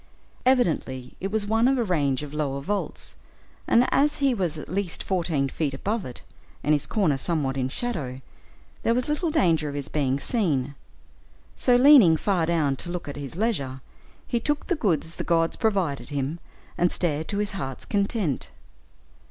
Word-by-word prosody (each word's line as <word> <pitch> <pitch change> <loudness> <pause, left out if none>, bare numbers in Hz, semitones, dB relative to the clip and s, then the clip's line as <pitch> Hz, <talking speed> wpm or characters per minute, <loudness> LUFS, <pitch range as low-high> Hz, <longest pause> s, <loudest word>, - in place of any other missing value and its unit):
Evidently 160 - +1
it 195 - -3
was 215 -1 +1
one 225 +3 +3
of 270 0 +3
a 240 - +2
range 145 - 0
of 145 -1 -8
lower 140 -3 -1
vaults, 200 +8 -3 0.5
and 245 +2 +4
as 295 +2 +3
he 275 -2 +2
was 180 -8 -1
at 150 - -7
least 185 -1 -2
fourteen 170 -7 0
feet 140 0 -2
above 205 +7 -2
it, 125 - -8 0.4
and 150 - +3
his 145 - 0
corner 165 -11 +1
somewhat 145 -4 -1
in 130 -1 -1
shadow, 140 - -3 0.6
there 230 - +2
was 250 - 0
little 300 +3 0
danger 165 - +2
of 140 - -6
his 140 -2 -4
being 140 -2 0
seen. 145 - 0 0.8
So, 250 - +3
leaning 245 - +7
far 175 -2 +1
down 150 -5 +1
to 175 - -4
look 175 -2 -5
at 145 - -5
his 140 +1 -7
leisure, 155 - -1 0.5
he 235 - 0
took 295 +5 -1
the 355 - 0
goods 170 - -1
the - - -3
gods 165 -1 +2
provided 190 -10 0
him, 145 +3 -2 0.4
and 175 0 +3
stared 160 -3 -1
to 200 - -3
his 210 0 -1
heart's 135 -10 -5
content. 200 - -1
170 Hz, 175 wpm, -25 LUFS, 140-220 Hz, 0.8 s, leaning